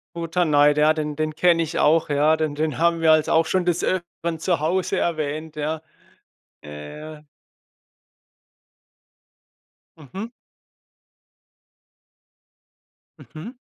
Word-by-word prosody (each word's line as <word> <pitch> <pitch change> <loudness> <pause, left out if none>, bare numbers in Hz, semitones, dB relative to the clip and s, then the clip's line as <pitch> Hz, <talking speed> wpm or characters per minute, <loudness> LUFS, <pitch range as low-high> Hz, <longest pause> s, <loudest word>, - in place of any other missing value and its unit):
Futterneid, 155 -4 +2
ja, 155 +1 +4
den 150 -1 -4
den 155 0 -3
kenne 170 -1 +3
ich 155 - -4
auch, 160 +1 +3
ja, 150 +2 +3
den 155 -2 -2
den 155 0 -2
haben 170 0 +2
wir 160 -1 +5
also 155 -1 +1
auch 160 0 +4
schon 185 +2 0
das 175 -1 0
Öfteren 170 -2 -3
zu 170 -2 0
Hause 175 +4 -1
erwähnt, 155 -1 -3
ja. 155 +1 -3 0.8
Ja, 75 - -10
ja. 150 - -10 2.7
Mhm. 190 - -8 2.9
Mhm. 175 +11 -10
155 Hz, 110 wpm, -22 LUFS, 150-170 Hz, 2.9 s, wir